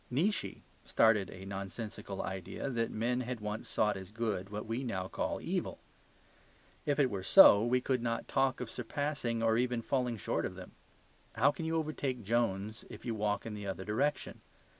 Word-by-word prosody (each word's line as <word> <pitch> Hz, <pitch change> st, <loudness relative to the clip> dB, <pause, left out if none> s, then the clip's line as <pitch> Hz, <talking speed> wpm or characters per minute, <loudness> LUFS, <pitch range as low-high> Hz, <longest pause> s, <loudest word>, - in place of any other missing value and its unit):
Nietzsche 175 Hz, +11 st, 0 dB, 0.2 s
started 105 Hz, -4 st, +3 dB
a 95 Hz, +1 st, -9 dB
nonsensical 100 Hz, +1 st, -5 dB
idea 95 Hz, +8 st, -4 dB
that 115 Hz, -2 st, 0 dB
men 120 Hz, +3 st, 0 dB
had 125 Hz, -1 st, -4 dB
once 105 Hz, +1 st, -5 dB
sought 105 Hz, -2 st, +2 dB
as 95 Hz, -1 st, -7 dB
good 105 Hz, -3 st, -2 dB
what 105 Hz, +1 st, -5 dB
we 115 Hz, +4 st, -2 dB
now 95 Hz, -7 st, -2 dB
call -, -, -2 dB
evil; -, -, -2 dB, 1.1 s
if 145 Hz, -, +2 dB
it 135 Hz, -4 st, +3 dB
were 100 Hz, -2 st, -3 dB
so, 100 Hz, +2 st, +8 dB
we 125 Hz, +2 st, +2 dB
could 130 Hz, -1 st, 0 dB
not 115 Hz, -1 st, -2 dB
talk 135 Hz, -2 st, +1 dB
of 125 Hz, -2 st, -5 dB
surpassing 125 Hz, -2 st, -2 dB
or 115 Hz, 0 st, +3 dB
even 125 Hz, -2 st, 0 dB
falling 125 Hz, -3 st, 0 dB
short -, -, -1 dB
of -, -, -3 dB
them. -, -, -10 dB, 0.6 s
How 140 Hz, -, +5 dB
can 165 Hz, -, -5 dB
you 165 Hz, -, 0 dB
overtake 145 Hz, -6 st, -2 dB
Jones 110 Hz, -1 st, 0 dB
if -, -, -10 dB
you 120 Hz, -, -1 dB
walk 105 Hz, -1 st, -1 dB
in 115 Hz, -, -5 dB
the 105 Hz, -1 st, -6 dB
other 95 Hz, -1 st, -4 dB
direction? 135 Hz, +8 st, -1 dB
115 Hz, 180 wpm, -33 LUFS, 105-125 Hz, 1.1 s, so